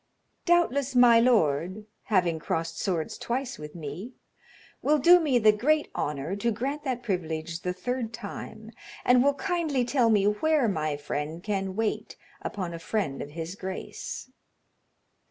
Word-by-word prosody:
"Doubtless 280 Hz, -6 st, +2 dB
my 240 Hz, -2 st, +7 dB
lord, 195 Hz, -, +2 dB, 0.2 s
having 180 Hz, -6 st, +2 dB
crossed 165 Hz, +1 st, -3 dB
swords 170 Hz, -5 st, -2 dB
twice 250 Hz, +1 st, -3 dB
with 150 Hz, +1 st, -9 dB
me, 170 Hz, -, -7 dB, 0.7 s
will 300 Hz, +1 st, +3 dB
do 345 Hz, +6 st, +7 dB
me 290 Hz, -7 st, +2 dB
the 215 Hz, -2 st, +6 dB
great 295 Hz, +9 st, +1 dB
honor 150 Hz, +5 st, -2 dB
to 235 Hz, +3 st, 0 dB
grant 275 Hz, +7 st, -3 dB
that 250 Hz, -2 st, -2 dB
privilege 165 Hz, -5 st, -3 dB
the 180 Hz, 0 st, -2 dB
third 230 Hz, +5 st, -3 dB
time, 220 Hz, -1 st, -8 dB, 0.3 s
and 250 Hz, 0 st, +5 dB
will 285 Hz, 0 st, +3 dB
kindly 325 Hz, -7 st, 0 dB
tell 245 Hz, -2 st, +2 dB
me 205 Hz, -3 st, +4 dB
where 265 Hz, +6 st, +2 dB
my 155 Hz, -6 st, -1 dB
friend 150 Hz, +3 st, -4 dB
can 195 Hz, -2 st, -2 dB
wait 220 Hz, 0 st, -2 dB, 0.2 s
upon 180 Hz, -4 st, -4 dB
a 165 Hz, -, -6 dB
friend 165 Hz, -6 st, -2 dB
of 145 Hz, -, -6 dB
his 165 Hz, +3 st, -6 dB
grace." 190 Hz, +6 st, -6 dB
215 Hz, 150 wpm, -27 LUFS, 165-255 Hz, 0.7 s, my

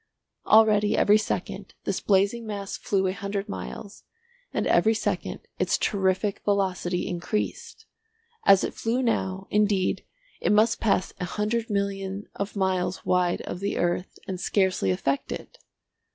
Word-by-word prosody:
Already 210 Hz, -1 st, +5 dB
every 210 Hz, +1 st, +5 dB
second 215 Hz, -, -4 dB
this -, -, -1 dB
blazing 205 Hz, +4 st, +2 dB
mass 200 Hz, -2 st, -4 dB
flew 195 Hz, -2 st, 0 dB
a 185 Hz, -, +1 dB
hundred 200 Hz, 0 st, -4 dB
miles, 200 Hz, 0 st, -7 dB, 0.5 s
and -, -, -1 dB
every 220 Hz, +1 st, +4 dB
second -, -, -2 dB, 0.2 s
its -, -, +2 dB
terrific 195 Hz, 0 st, 0 dB
velocity 190 Hz, -3 st, 0 dB
increased. 215 Hz, -, -3 dB, 0.6 s
As 195 Hz, -1 st, +6 dB
it -, -, -2 dB
flew 240 Hz, +3 st, -1 dB
now, 190 Hz, -5 st, -1 dB
indeed, 205 Hz, -3 st, +2 dB, 0.4 s
it -, -, +1 dB
must 215 Hz, +2 st, +4 dB
pass 200 Hz, -4 st, +1 dB
a 180 Hz, -, -2 dB
hundred 220 Hz, +5 st, -1 dB
million 200 Hz, -1 st, -2 dB
of 200 Hz, +1 st, -4 dB
miles 190 Hz, -2 st, -1 dB
wide 180 Hz, -1 st, +2 dB
of -, -, -6 dB
the 200 Hz, +1 st, -2 dB
earth 175 Hz, +1 st, -1 dB
and 185 Hz, -2 st, -4 dB
scarcely 190 Hz, -, +1 dB
affect 140 Hz, +9 st, -1 dB
it. -, -, -7 dB
200 Hz, 140 wpm, -26 LUFS, 190-210 Hz, 0.6 s, As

